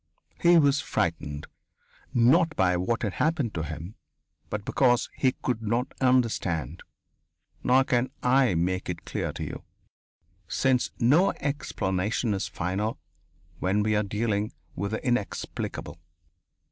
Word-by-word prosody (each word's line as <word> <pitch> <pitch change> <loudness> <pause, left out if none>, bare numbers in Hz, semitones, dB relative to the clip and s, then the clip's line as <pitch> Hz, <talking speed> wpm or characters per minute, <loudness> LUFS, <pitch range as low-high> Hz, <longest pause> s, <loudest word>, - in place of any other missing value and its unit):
He 175 0 +6
was 140 -2 +4
frightened, 75 -4 -2 0.7
not 155 +8 +4
by 90 -2 +3
what 105 +8 -1
had 100 -4 -1
happened 150 -8 0
to 80 - -2
him, 80 +5 -6 0.6
but 105 -1 -4
because 125 -3 +2
he 130 -2 +2
could 125 -3 -1
not 115 +3 -1
understand. 115 - +1 0.8
Nor 130 +2 +5
can 125 -1 +1
I 125 -5 +4
make 90 +3 -1
it 85 -2 -5
clear - - -2
to - - -5
you, - - -6 0.8
since 130 +3 +1
no 155 +11 +4
explanation 105 -6 -1
is 95 -3 -2
final 95 +6 -2 0.6
when 100 +3 +1
we 110 0 +1
are 105 - +3
dealing 105 0 -1 0.2
with 100 - -2
the 110 +5 -4
inexplicable.... 120 -5 -3
110 Hz, 130 wpm, -27 LUFS, 95-130 Hz, 0.8 s, He